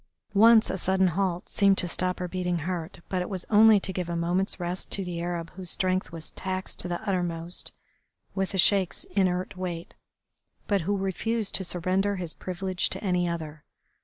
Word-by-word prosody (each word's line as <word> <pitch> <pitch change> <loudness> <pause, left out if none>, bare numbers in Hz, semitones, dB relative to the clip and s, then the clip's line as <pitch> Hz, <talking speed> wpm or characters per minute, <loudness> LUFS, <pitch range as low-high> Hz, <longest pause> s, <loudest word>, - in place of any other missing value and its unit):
Once 220 +2 +6
a 190 - -2
sudden 190 +1 +3
halt 180 0 -1
seemed 200 -2 +3
to 180 - +2
stop 180 +1 0
her - - -4
heart 180 - -5
beating, 180 -2 -1 0.4
but 185 -1 -1
it 180 - -4
was 185 -3 -4
only 215 0 +7
to 190 0 -3
give 180 -2 -3
a 170 - -2
moment's 175 +4 0
rest 175 +1 -3
to 195 - 0
the 175 -1 -4
Arab 170 -1 -3
whose 185 -1 -4
strength 185 +1 0
was 165 -1 -8
taxed 185 0 -4
to - - -1
the 175 0 -2
uttermost 175 -2 -1 0.6
with 195 -1 -1
the 195 - -3
Sheik's 190 0 +4
inert 185 -2 0
weight, 175 -2 -5 0.7
but 200 -2 +1
who 200 +5 0
refused 205 +3 -1
to 190 - +2
surrender 185 +3 0
his 175 -4 -3
privilege 185 0 -2
to - - -4
any 180 -3 +1
other. 155 -3 -5
185 Hz, 190 wpm, -27 LUFS, 175-195 Hz, 0.7 s, only